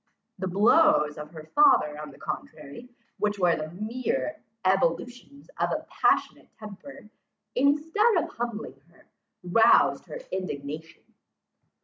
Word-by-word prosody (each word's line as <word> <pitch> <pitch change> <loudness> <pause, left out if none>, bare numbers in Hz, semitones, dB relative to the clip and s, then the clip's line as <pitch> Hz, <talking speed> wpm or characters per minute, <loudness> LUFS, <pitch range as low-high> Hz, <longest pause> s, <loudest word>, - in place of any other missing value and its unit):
The 190 - -2
blows 200 - +3
of 150 0 -8
her 160 -1 -11
father 150 - +4
on 150 - -8
the 140 - -15
contrary, 150 - -8 0.3
which 210 0 0
were 180 -3 +3
the 155 0 -5
mere 240 - -3 0.2
ebullitions 250 +7 -1
of - - +1
a - - -3
passionate - - 0
temper, 220 +4 -11 0.5
instead 310 - +2
of 335 - 0
humbling 220 - -6
her, 170 - -24 0.4
roused 200 +6 +4
her - - -7
indignation. 155 -3 -6
210 Hz, 120 wpm, -26 LUFS, 155-260 Hz, 0.5 s, father